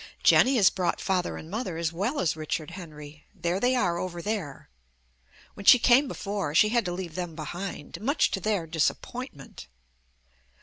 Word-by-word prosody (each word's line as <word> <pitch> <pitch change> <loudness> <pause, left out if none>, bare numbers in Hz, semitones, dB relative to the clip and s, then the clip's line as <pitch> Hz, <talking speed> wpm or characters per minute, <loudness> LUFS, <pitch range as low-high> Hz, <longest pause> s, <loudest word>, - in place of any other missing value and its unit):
Jenny 265 +2 +6
has 205 -6 +5
brought 185 -2 -1
Father 185 -2 -1
and 155 - -9
Mother 190 -2 -4
as 165 -1 -2
well 215 - -1
as 165 - +1
Richard 155 +1 -4
Henry. 150 -4 -11
There 175 +2 -1
they 250 +4 +2
are, 175 -8 +1
over 175 -2 -4
there. 185 -7 -4 0.9
When 200 - -10
she - - +10
came 250 +4 +4
before 200 - -4
she 210 - +6
had 235 -1 +1
to 175 - -2
leave 175 -2 -5
them 175 -2 -5
behind, 170 +1 -6
much 280 +7 +2
to - - -1
their 200 -3 -1
disappointment. 160 - -3
180 Hz, 170 wpm, -27 LUFS, 165-215 Hz, 0.9 s, she